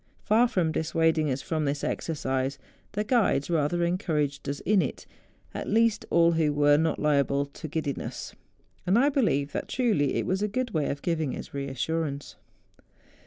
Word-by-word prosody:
Far 230 +3 +4
from 175 -8 0
dissuading 160 -1 +1
us 135 0 -2
from 155 -2 -1
this 145 0 -2
exercise, 135 -4 -2 0.4
the 210 - -1
guides 210 - +1
rather 165 +2 +1
encouraged 150 -6 -1
us 140 - -3
in 200 0 +3
it, 140 - -4 0.5
at - - -5
least 225 0 +2
all 170 0 +4
who 160 -2 +2
were 145 0 +4
not 160 +1 +1
liable 140 -1 +2
to 145 +3 -9
giddiness; 150 -2 -4 0.5
and 190 +5 +4
I 275 +4 +4
believe 145 - +1
that - - -4
truly 215 - +1
it - - 0
was 190 +2 -1
a 210 - +1
good 245 +3 -2
way 155 -5 0
of 140 - -4
giving 160 -5 -1
us - - -9
assurance. 140 +2 -3
160 Hz, 165 wpm, -27 LUFS, 140-185 Hz, 0.5 s, Far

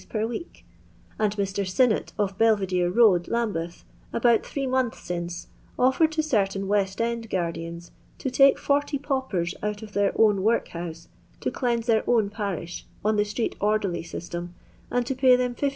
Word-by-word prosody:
per 215 -1 -1
week 240 +10 -7 0.3
;— - - -30
«nd 205 -1 +2
Mr. 200 -1 -1
Sinnott, 215 +5 +1
of 200 -2 0
Bel 225 +1 +5
videre 180 -2 0
road, 190 -5 +4
Lambeth, 190 -8 -2 0.3
about 235 -1 +3
three 275 -1 -3
months 255 -2 0
sinoe, 175 0 -4 0.3
ofilered 265 +5 +4
to 315 0 -1
certain 195 -8 0
West 195 -1 0
End 230 -1 -2
guardians, 170 -1 -4 0.3
to 265 - -3
take 275 +1 +6
40 285 0 0
paupers 260 - -2
out 210 +1 -3
of 210 -1 -10
their 200 0 +2
own 210 -3 +4
workhouse 170 -6 -2 0.3
to - - -2
cleanse 235 -3 -1
their 225 -2 +3
own 220 -4 +3
parish, 195 -6 -4 0.2
on 215 0 +3
the 210 - +3
street 210 +3 -2
orderly 205 -3 0
system; 175 +1 -6 0.2
— - - -30
and 245 0 +1
to 265 - -1
pay 260 -1 +5
them 250 0 0
15«. 280 +4 0
210 Hz, 175 wpm, -25 LUFS, 185-245 Hz, 0.3 s, take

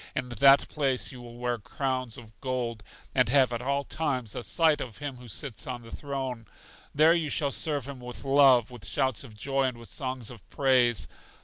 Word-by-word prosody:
In 125 -1 -2
that 135 +4 +6
place 130 -8 -1
you 125 - -10
will 120 -1 -11
wear 120 -1 -1
crowns 130 +1 -2
of 110 -3 -12
gold, 125 -4 -2 0.3
and - - +3
have 130 -2 +4
at 120 - -2
all 140 +2 0
times 130 -8 -2
a - - -4
sight 160 +4 +3
of 110 -5 -6
Him 145 -3 -5
who 125 0 -12
sits 115 +1 -4
on 125 -2 -5
the 115 - -8
throne. 130 -5 -4 0.5
There 155 +3 +6
you 165 -3 0
shall 140 0 +1
serve 145 -2 -1
Him 140 -2 -7
with 125 0 -8
love, 135 -4 +5
with 120 -4 -8
shouts 130 -4 0
of 110 -5 -13
joy 135 +4 0
and 125 -2 -2
with 115 -1 -12
songs 130 -4 -4
of 115 -5 -14
praise. 125 -5 +3
130 Hz, 205 wpm, -28 LUFS, 120-140 Hz, 0.5 s, that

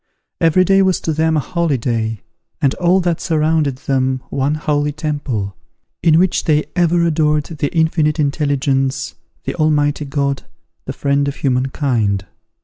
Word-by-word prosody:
Every 165 +3 +4
day 195 +1 +4
was 190 -1 +2
to 160 - -1
them 160 +1 +1
a - - +3
holyday, 120 - -1 0.4
and 135 -1 +2
all 180 +1 +3
that 175 -2 -1
surrounded 155 -3 +1
them 130 -1 -1
one 140 +2 0
holy 150 -1 0
temple, 145 -10 -3 0.5
in 160 -2 +4
which 180 +1 +2
they 150 -1 +2
ever 175 -1 +2
adored 150 -2 +2
the 150 -3 -3
Infinite 160 -2 +1
Intelligence, 140 -2 0 0.3
the - - -3
Almighty 150 -2 +1
God, 140 -1 -1 0.4
the - - -4
Friend 140 0 0
of 140 - -3
human 130 -1 0
kind. 110 -9 -1
150 Hz, 145 wpm, -18 LUFS, 135-160 Hz, 0.5 s, Every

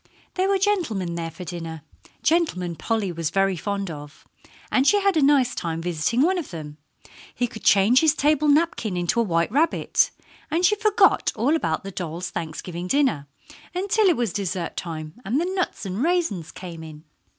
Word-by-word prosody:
There 380 +1 0
were 395 - +3
gentlemen 330 - 0
there 165 -1 -3
for 165 +3 -9
dinner 165 -3 -6 0.4
gentlemen 180 - +1
Polly 210 +2 -1
was 165 -2 -2
very 195 +2 +1
fond 200 +1 -3
of 145 0 -11 0.4
and 270 +1 +3
she 410 - +5
had 395 -2 +2
a 310 - +3
nice 275 -3 +4
time 165 -1 -3
visiting 175 +7 0
with - - +5
one 375 +2 +2
of 325 - -6
them. 150 -3 -8 0.6
He 245 - +1
could 220 -2 -9
change 205 +6 +5
his 310 -2 +3
table 300 0 +2
napkin 285 - +2
into 175 +6 0
a - - +4
white 170 -4 0
rabbit, 305 +7 +2 0.4
and 340 +3 +1
she 420 - +4
forgot 420 -1 +3
all 255 +8 +2
about 160 - -1
the 195 - -6
dolls' 175 -1 -5
Thanksgiving 170 +2 -5
dinner 255 - +1 0.5
until 400 +3 +2
it 350 - +3
was 235 -6 -1
dessert 185 -3 -3
time, 160 +4 -6
and 235 +9 0
the 340 - 0
nuts 370 - -2
and 195 +3 -3
raisins 300 - 0
came 175 -3 -9
in. 155 -1 -11
200 Hz, 185 wpm, -24 LUFS, -, 0.6 s, she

